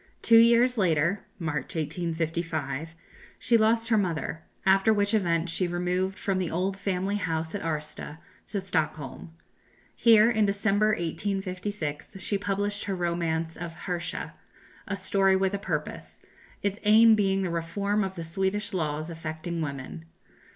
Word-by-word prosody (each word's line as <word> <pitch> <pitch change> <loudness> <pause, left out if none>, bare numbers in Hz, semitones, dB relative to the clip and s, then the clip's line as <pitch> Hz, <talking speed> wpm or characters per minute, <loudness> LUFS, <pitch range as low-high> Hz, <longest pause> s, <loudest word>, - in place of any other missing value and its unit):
Two 230 -1 +7
years 235 +1 +5
later 170 +1 +2 0.2
(March, 160 -3 -3
1855) 160 -2 -3 0.4
she 235 - +2
lost 225 +1 +3
her 220 -2 +4
mother; 165 -4 -2 0.2
after 195 +3 +5
which 205 0 +1
event 170 -5 +1
she 180 +2 0
removed 180 +2 -1
from 195 -2 -1
the 180 -3 -1
old 185 +3 -1
family 195 0 -1
house 165 -4 -2
at 205 - -3
Arsta 150 -1 -4 0.3
to 205 - -2
Stockholm. 160 -5 -3 0.6
Here, 225 -2 +6
in 220 -2 +2
December, 200 +1 +2
1856, 195 -2 -3
she 200 +2 -1
published 205 +1 -2
her 195 - -2
romance 170 -2 -1
of 170 -1 -7
"Hersha," 175 -1 -3 0.5
a 200 - -2
story 195 0 +2
with 190 +1 +1
a 200 - -1
purpose - - -4 0.4
its 200 +1 -1
aim 220 +2 +7
being 195 -2 +2
the 180 - -2
reform 200 +5 -1
of 190 0 -4
the 170 - -5
Swedish 190 +6 -1
laws 155 -2 -2
affecting 165 +1 -5
women. 130 - -5
185 Hz, 145 wpm, -27 LUFS, 165-205 Hz, 0.6 s, Two